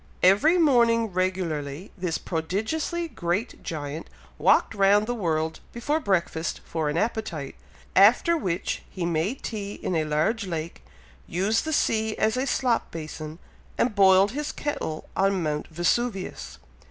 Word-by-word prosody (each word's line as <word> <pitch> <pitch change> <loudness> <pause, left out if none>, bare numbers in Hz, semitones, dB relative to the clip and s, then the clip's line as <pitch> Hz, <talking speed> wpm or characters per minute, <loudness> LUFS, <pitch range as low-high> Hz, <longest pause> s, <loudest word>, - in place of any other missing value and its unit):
Every 210 - +5
morning 235 - +3
regularly, 175 -3 -2
this 180 -3 -2
prodigiously 220 - -2
great 185 - -3
giant 150 0 -5 0.3
walked - - +4
round 200 +1 +4
the 245 - -2
world 160 -7 -1
before 290 +7 -1
breakfast 170 - -1
for 160 -2 -2
an 150 - -1
appetite, 170 - -2 0.4
after 220 - +6
which, 185 - -2
he 180 -3 -4
made 170 +9 -1
tea 205 -3 -4
in 180 - -3
a 160 -1 +1
large 175 +8 0
lake, 165 - -5 0.4
used 195 - 0
the 315 - -2
sea 220 -5 +1
as 220 - +2
a 260 +2 -1
slop 250 -3 +1
basin, 155 -1 -7 0.4
and 235 - +1
boiled 195 0 +5
his 295 +4 -3
kettle 160 - -4
on 195 -2 +2
Mount 150 -1 -2
Vesuvius. 190 +5 -2
190 Hz, 140 wpm, -26 LUFS, 165-230 Hz, 0.4 s, after